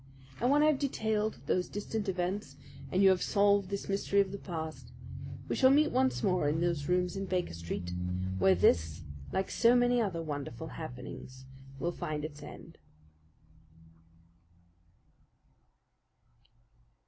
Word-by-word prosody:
And 245 Hz, -, +2 dB
when 290 Hz, +2 st, +5 dB
I -, -, +6 dB
have 305 Hz, -3 st, +3 dB
detailed 220 Hz, -6 st, -1 dB
those 180 Hz, -1 st, 0 dB
distant 205 Hz, 0 st, -3 dB
events 180 Hz, -4 st, -2 dB, 0.4 s
and 190 Hz, +2 st, +3 dB
you 195 Hz, -, +8 dB
have 185 Hz, -1 st, +3 dB
solved 200 Hz, -2 st, +3 dB
this 200 Hz, 0 st, -4 dB
mystery 200 Hz, 0 st, +1 dB
of 200 Hz, -1 st, +2 dB
the 200 Hz, -, -6 dB
past, 160 Hz, -3 st, -6 dB, 0.6 s
we -, -, -1 dB
shall 260 Hz, -, +6 dB
meet 300 Hz, +3 st, +4 dB
once 260 Hz, +1 st, +1 dB
more 180 Hz, -7 st, +2 dB
in 155 Hz, +2 st, 0 dB
those 170 Hz, -3 st, -1 dB
rooms 180 Hz, 0 st, +1 dB
on 195 Hz, 0 st, -3 dB
Baker 180 Hz, -, -1 dB
Street, 85 Hz, +1 st, -5 dB, 0.5 s
where 95 Hz, 0 st, +5 dB
this, 80 Hz, -2 st, +2 dB, 0.3 s
like 190 Hz, -, -1 dB
so 235 Hz, +1 st, +5 dB
many 245 Hz, 0 st, +4 dB
other 180 Hz, -6 st, -2 dB
wonderful 145 Hz, -1 st, -5 dB
happenings, 130 Hz, -2 st, -8 dB, 0.3 s
will 170 Hz, +6 st, -1 dB
find 155 Hz, -4 st, -4 dB
its 150 Hz, -1 st, -8 dB
end. -, -, -11 dB
185 Hz, 140 wpm, -31 LUFS, 150-210 Hz, 0.6 s, you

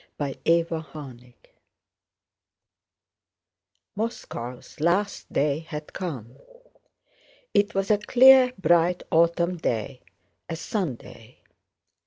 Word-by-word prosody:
CHAPTER 145 Hz, +4 st, +1 dB
XV 145 Hz, -7 st, -9 dB, 2.6 s
Moscow's 125 Hz, -, -6 dB
last 180 Hz, +6 st, 0 dB
day 145 Hz, +1 st, +1 dB
had 155 Hz, -2 st, -8 dB
come. 130 Hz, -, -6 dB, 1.2 s
It 205 Hz, 0 st, +2 dB
was 195 Hz, +2 st, 0 dB
a 210 Hz, -, +3 dB
clear 255 Hz, +3 st, +6 dB
bright 175 Hz, -1 st, +2 dB
autumn 170 Hz, +2 st, +2 dB
day, 125 Hz, -3 st, -3 dB, 0.5 s
a 165 Hz, -, -3 dB
Sunday. 140 Hz, -, -6 dB
165 Hz, 80 wpm, -25 LUFS, 135-190 Hz, 2.6 s, clear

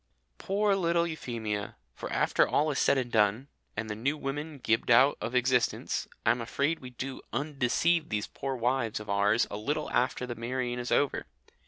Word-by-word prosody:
Poor 200 Hz, +1 st, +1 dB
little 170 Hz, -2 st, +2 dB
Euphemia! 115 Hz, -10 st, -4 dB, 0.2 s
For -, -, -7 dB
after -, -, +3 dB
all 150 Hz, +1 st, +2 dB
is 140 Hz, -, -1 dB
said 140 Hz, -, +3 dB
and 125 Hz, -2 st, -2 dB
done, 110 Hz, +5 st, +2 dB, 0.3 s
and 110 Hz, +1 st, -2 dB
the 105 Hz, -, -3 dB
New 135 Hz, +8 st, -1 dB
Woman 145 Hz, +2 st, -4 dB
gibed 115 Hz, -3 st, 0 dB
out 130 Hz, +4 st, +6 dB
of 120 Hz, -, -3 dB
existence, 125 Hz, -1 st, +1 dB, 0.2 s
I -, -, +6 dB
am 120 Hz, 0 st, -1 dB
afraid 140 Hz, +7 st, 0 dB
we 125 Hz, -, -9 dB
do 130 Hz, +2 st, -6 dB
undeceive 150 Hz, +5 st, +1 dB
these 105 Hz, -2 st, -1 dB
poor 135 Hz, -1 st, -4 dB
wives 120 Hz, -2 st, 0 dB
of 105 Hz, -1 st, -6 dB
ours 105 Hz, +3 st, +3 dB
a 105 Hz, -, -3 dB
little 150 Hz, +8 st, -2 dB
after 125 Hz, 0 st, +1 dB
the 120 Hz, -, -4 dB
marrying 120 Hz, +1 st, -3 dB
is 125 Hz, -, -4 dB
over. 140 Hz, -, +1 dB
125 Hz, 185 wpm, -29 LUFS, 115-145 Hz, 0.3 s, out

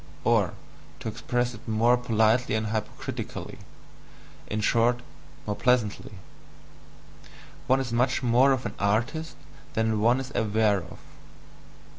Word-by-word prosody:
Or, -, -, +2 dB, 0.4 s
to -, -, -6 dB
express 120 Hz, +2 st, -1 dB
it 110 Hz, -, -13 dB
more 115 Hz, +2 st, +4 dB
politely 115 Hz, -1 st, +2 dB
and 110 Hz, -1 st, -1 dB
hypocritically, 110 Hz, 0 st, -5 dB, 0.9 s
in 105 Hz, -, -2 dB
short, 120 Hz, +2 st, +2 dB, 0.4 s
more 105 Hz, -, -2 dB
pleasantly 120 Hz, -4 st, 0 dB, 1.5 s
one 130 Hz, +1 st, +4 dB
is 125 Hz, -3 st, -3 dB
much 125 Hz, +2 st, +1 dB
more 125 Hz, +3 st, +4 dB
of 130 Hz, -1 st, 0 dB
an -, -, -3 dB
artist 120 Hz, +11 st, 0 dB, 0.4 s
than 110 Hz, -1 st, 0 dB
one 120 Hz, +4 st, +4 dB
is 135 Hz, 0 st, -6 dB
aware 110 Hz, -1 st, +2 dB
of. 85 Hz, -2 st, -11 dB
115 Hz, 120 wpm, -26 LUFS, 110-125 Hz, 1.5 s, more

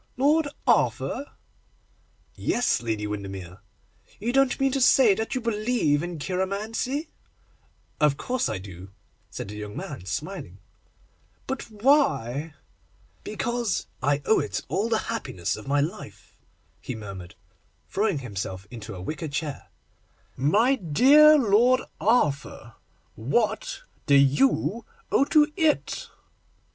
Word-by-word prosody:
'Lord 295 Hz, +4 st, +3 dB, 0.2 s
Arthur?' 285 Hz, -, +1 dB, 1.1 s
'Yes, 240 Hz, -, 0 dB
Lady 110 Hz, -3 st, -2 dB
Windermere.' 95 Hz, -3 st, -6 dB, 0.6 s
'You 235 Hz, +4 st, -2 dB
don't 270 Hz, -1 st, +3 dB
mean 270 Hz, 0 st, +2 dB
to 275 Hz, 0 st, -1 dB
say 250 Hz, -4 st, +6 dB
that 220 Hz, +6 st, -3 dB
you 255 Hz, -, -1 dB
believe 215 Hz, -9 st, +1 dB
in 175 Hz, 0 st, -5 dB
cheiromancy?' 210 Hz, -, -2 dB, 0.9 s
'Of 150 Hz, -2 st, +3 dB
course 255 Hz, -1 st, -1 dB
I -, -, -2 dB
do,' 95 Hz, -1 st, -10 dB, 0.4 s
said -, -, -7 dB
the 105 Hz, -, -7 dB
young 105 Hz, 0 st, -7 dB
man, 90 Hz, -, -7 dB
smiling. 100 Hz, -, -5 dB, 0.9 s
'But 265 Hz, -2 st, -5 dB
why?' 205 Hz, -, +1 dB, 0.7 s
'Because 235 Hz, -2 st, -2 dB, 0.2 s
I 145 Hz, +1 st, +1 dB
owe 220 Hz, -, +4 dB
to -, -, -1 dB
it -, -, -4 dB
all 220 Hz, +4 st, 0 dB
the 225 Hz, -, +2 dB, 0.2 s
happiness 90 Hz, -, -3 dB
of 110 Hz, -, -10 dB
my 140 Hz, +1 st, +2 dB
life,' 155 Hz, +4 st, -6 dB, 0.4 s
he 130 Hz, -, -6 dB
murmured, 100 Hz, -4 st, -9 dB, 0.5 s
throwing 200 Hz, -4 st, 0 dB
himself 95 Hz, -3 st, -5 dB
into 115 Hz, -5 st, -8 dB
a 90 Hz, -, -8 dB
wicker 155 Hz, -, -4 dB
chair. 145 Hz, 0 st, -4 dB, 0.7 s
'My 215 Hz, -, +3 dB
dear 275 Hz, -, +6 dB
Lord 245 Hz, +1 st, +4 dB, 0.2 s
Arthur, 175 Hz, -, 0 dB, 0.4 s
what 240 Hz, -, -1 dB, 0.2 s
do 140 Hz, -, +5 dB
you 150 Hz, -, +3 dB, 0.3 s
owe 275 Hz, -, +4 dB
to 300 Hz, 0 st, +3 dB
it? 320 Hz, -5 st, 0 dB
190 Hz, 125 wpm, -25 LUFS, -, 1.1 s, say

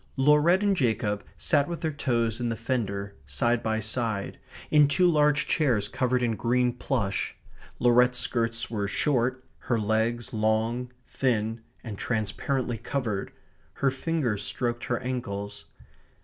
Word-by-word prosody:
Laurette 150 Hz, +7 st, +4 dB
and 200 Hz, -1 st, +3 dB
Jacob 110 Hz, -, 0 dB
sat 145 Hz, -3 st, +2 dB
with 170 Hz, -1 st, -5 dB
their 160 Hz, -2 st, -1 dB
toes 120 Hz, -5 st, 0 dB
in 120 Hz, -, 0 dB
the 115 Hz, -, -1 dB
fender 105 Hz, -4 st, -2 dB
side 120 Hz, -, +1 dB
by 110 Hz, -1 st, 0 dB
side, 110 Hz, -2 st, -3 dB, 0.3 s
in 150 Hz, -1 st, +6 dB
two 180 Hz, +6 st, +3 dB
large 150 Hz, -2 st, +3 dB
chairs 120 Hz, -10 st, +1 dB
covered 125 Hz, +1 st, 0 dB
in 115 Hz, -2 st, +1 dB
green 125 Hz, +3 st, +1 dB
plush. 110 Hz, -6 st, -2 dB, 0.4 s
Laurette's 125 Hz, +1 st, +4 dB
skirts 115 Hz, -2 st, -1 dB
were 105 Hz, -3 st, -2 dB
short, 130 Hz, +2 st, 0 dB
her 120 Hz, -, 0 dB
legs 110 Hz, +2 st, 0 dB
long, 110 Hz, +3 st, 0 dB
thin, 115 Hz, -3 st, -1 dB, 0.2 s
and 105 Hz, -5 st, -7 dB
transparently 120 Hz, +2 st, -1 dB
covered. 110 Hz, -8 st, -2 dB, 0.4 s
Her 135 Hz, -1 st, +1 dB
fingers 130 Hz, -7 st, -1 dB
stroked 120 Hz, +2 st, -2 dB
her 120 Hz, -, 0 dB
ankles. 105 Hz, -6 st, -4 dB
120 Hz, 135 wpm, -27 LUFS, 110-130 Hz, 0.4 s, in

